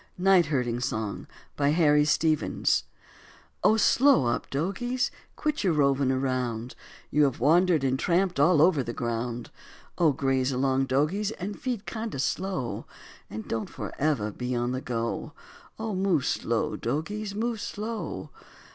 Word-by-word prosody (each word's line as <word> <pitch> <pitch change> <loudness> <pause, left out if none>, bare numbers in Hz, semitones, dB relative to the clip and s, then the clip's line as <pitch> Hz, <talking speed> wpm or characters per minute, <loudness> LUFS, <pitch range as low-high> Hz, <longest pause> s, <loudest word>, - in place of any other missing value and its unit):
NIGHT 185 -2 +4
HERDING 125 -5 0
SONG 110 -4 -3 0.3
BY 145 -1 +2
HARRY 150 -3 +4
STEPHENS 155 0 +1 0.8
Oh, 220 - +5
slow 240 - +4
up, 120 - -1
dogies, 200 - -1 0.2
quit 300 -4 -1
your 185 -4 +3
roving 140 -2 +2
round, 125 -3 -2 0.4
You 150 +1 +4
have 135 -3 -1
wandered 165 +3 +4
and 130 0 +1
tramped 180 0 +1
all 150 +1 +5
over 165 -5 +4
the 120 -1 -4
ground; 120 0 -3 0.5
Oh, 165 -3 +5
graze 135 -1 0
along, 135 +1 +1
dogies, 155 +11 +1
and 205 -1 -6
feed 245 -5 -3
kinda 220 -6 -4
slow, 160 -2 -2 0.4
And 110 0 -7
don't 115 -1 -3
forever 135 -8 -2
be 125 +4 -3
on 120 +1 0
the 130 0 -3
go, 120 +5 -3 0.4
Oh, 220 -1 -3
move 185 -7 +1
slow, - - -1
dogies, 205 +7 -3
move 225 0 -2
slow. 220 +2 -5
150 Hz, 140 wpm, -27 LUFS, 130-195 Hz, 0.8 s, Oh